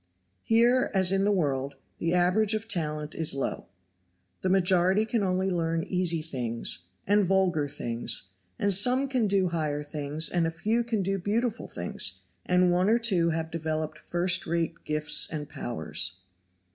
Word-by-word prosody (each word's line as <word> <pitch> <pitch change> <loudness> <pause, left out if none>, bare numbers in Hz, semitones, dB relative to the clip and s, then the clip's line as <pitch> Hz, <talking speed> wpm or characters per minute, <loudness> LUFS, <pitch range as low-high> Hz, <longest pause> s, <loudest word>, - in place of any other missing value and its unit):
Here, 240 +3 +3
as 190 -1 +4
in 195 0 +1
the 205 - +3
world, 140 -7 -1 0.2
the 165 +2 0
average 200 +5 +3
of 215 +1 -4
talent 155 -7 -2
is 160 -3 +4
low. 135 - -3 0.7
The 185 - 0
majority 185 +2 +3
can 225 0 -1
only 190 0 0
learn 165 -2 -1
easy 175 -3 0
things, 120 - -2 0.3
and 205 +1 +3
vulgar 180 -5 +1
things, 120 -4 -1 0.3
and 200 -1 +1
some 250 +8 +2
can 255 -5 0
do 195 -2 +2
higher 150 -3 -2
things 150 +1 -1
and 170 -2 0
a - - 0
few 215 +8 -1
can 225 -4 -1
do 195 +1 -1
beautiful 225 +5 -2
things, 90 +2 -4 0.3
and 180 0 +3
one 180 +3 +2
or 230 - +4
two 190 -8 +2
have 160 0 -3
developed 155 -1 -3
first 180 +1 0
rate 170 0 -1
gifts 150 0 +3
and 150 -2 -5
powers. 85 - -2
175 Hz, 160 wpm, -27 LUFS, 155-200 Hz, 0.7 s, as